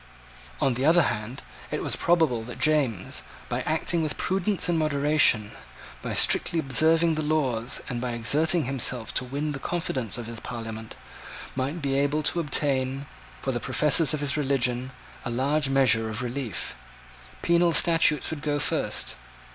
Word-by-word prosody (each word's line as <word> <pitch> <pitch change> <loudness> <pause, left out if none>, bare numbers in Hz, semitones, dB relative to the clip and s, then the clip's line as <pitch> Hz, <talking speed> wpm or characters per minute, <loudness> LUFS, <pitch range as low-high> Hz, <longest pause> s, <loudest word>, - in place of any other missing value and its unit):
On 135 - +2
the 125 +2 -3
other 165 +3 +5
hand, 110 +2 -4 0.3
it - - -3
was - - 0
probable 160 -9 +2
that 125 - -8
James, 140 -11 0 0.3
by - - -2
acting 160 +2 +1
with 155 -2 -3
prudence 195 +1 0
and 170 -2 +1
moderation, 145 -7 +3 0.5
by - - -4
strictly 170 - +3
observing 160 +3 +3
the 155 - -2
laws 135 -7 0
and 120 -2 -4
by 125 -1 -3
exerting 150 +8 +2
himself 125 -3 0
to - - -1
win 140 +4 -3
the 135 - -5
confidence 130 - -2
of 120 - -6
his 115 0 -6
Parliament, 110 -2 -7 0.6
might 140 +5 -3
be 135 -1 0
able 145 +2 0
to 170 - +1
obtain, 135 -3 0 0.4
for 135 - -1
the 120 - -2
professors 150 +4 +4
of 155 -2 -1
his 140 -1 +1
religion, 130 -3 -1 0.3
a - - -4
large 135 +4 0
measure 115 -5 +2
of 110 +3 -4
relief. 125 -5 -4 0.7
Penal 170 0 +3
statutes 165 -3 +2
would 155 -2 -5
go 150 -1 -1
first. 145 - -2
140 Hz, 160 wpm, -26 LUFS, 125-155 Hz, 0.7 s, other